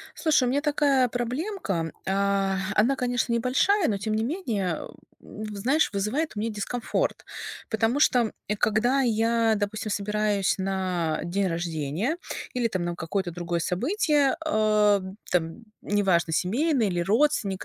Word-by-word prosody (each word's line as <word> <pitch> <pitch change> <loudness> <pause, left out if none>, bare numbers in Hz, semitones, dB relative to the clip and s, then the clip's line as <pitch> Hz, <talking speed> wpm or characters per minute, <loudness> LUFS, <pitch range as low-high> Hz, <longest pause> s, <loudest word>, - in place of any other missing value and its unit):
Слушай, 305 -5 +3
у 245 - +1
меня 280 +3 +1
такая 285 -3 +2
проблемка. 240 - -2
А, 195 0 +1 0.2
она, 240 +7 +3
конечно, 245 -1 0
небольшая, 280 - +2
но, 205 - 0
тем 215 +2 -2
не 220 - 0
менее, 230 - -1
а, - - -7 0.3
у, 215 - -9
в 210 -1 -6
знаешь, 265 +10 +2
вызывает 215 +11 -1
у - - -2
меня 225 +2 -1
дискомфорт. 235 - -2 0.5
Потому 225 +5 +1
что, 255 -4 +5
м, 225 -2 -1 0.2
э, 210 - 0
когда 230 +6 +2
я, 230 -1 +2
допустим, 210 +1 -3
собираюсь 205 -1 0
на 185 -4 -1
день 190 +3 0
рождения 165 - -2 0.4
или 245 -2 +1
там 185 -5 -2
на 175 0 -2
какое-то 175 +2 -3
другое 170 0 -3
событие, 285 - +1
а, 215 -7 +3 0.3
там, 170 +5 -1 0.2
неважно, 190 -5 +1
семейное 240 - +1
или 175 -2 -1
родственник 210 - +1
215 Hz, 150 wpm, -26 LUFS, 190-250 Hz, 0.5 s, что